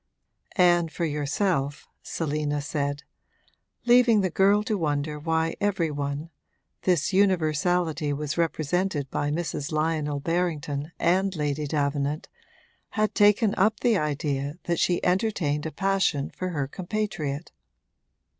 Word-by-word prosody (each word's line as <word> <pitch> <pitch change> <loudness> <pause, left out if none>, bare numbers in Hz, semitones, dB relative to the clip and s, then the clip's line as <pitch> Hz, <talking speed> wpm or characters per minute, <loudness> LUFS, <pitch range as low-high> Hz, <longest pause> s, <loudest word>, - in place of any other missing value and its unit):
'And 175 -3 +4
for 170 - -2
yourself,' 145 0 -1
Selina 150 -2 -2
said, 145 0 -2 0.8
leaving 240 -3 +5
the 185 -2 0
girl 200 +4 +4
to 215 0 -1
wonder 150 -3 -1
why 160 +1 0
every 195 -6 +1
one 145 +2 -4 0.5
(this 180 +1 +1
universality 170 -4 +2
was 145 0 -2
represented 165 -2 -1
by 145 - -1
Mrs. 160 -1 -3
Lionel 155 -2 0
Berrington 155 -2 -2
and 190 +2 +2
Lady 150 -1 -1
Davenant) 145 0 -1 0.7
had 215 0 +2
taken 210 +1 +4
up 210 +2 +2
the 235 -2 +3
idea 145 -3 -1
that 170 -1 -1
she 175 -1 +1
entertained 180 -6 0
a - - -5
passion 190 -4 0
for 185 - -4
her 145 -6 -2
compatriot. 175 -4 -3
160 Hz, 120 wpm, -26 LUFS, 145-185 Hz, 0.8 s, leaving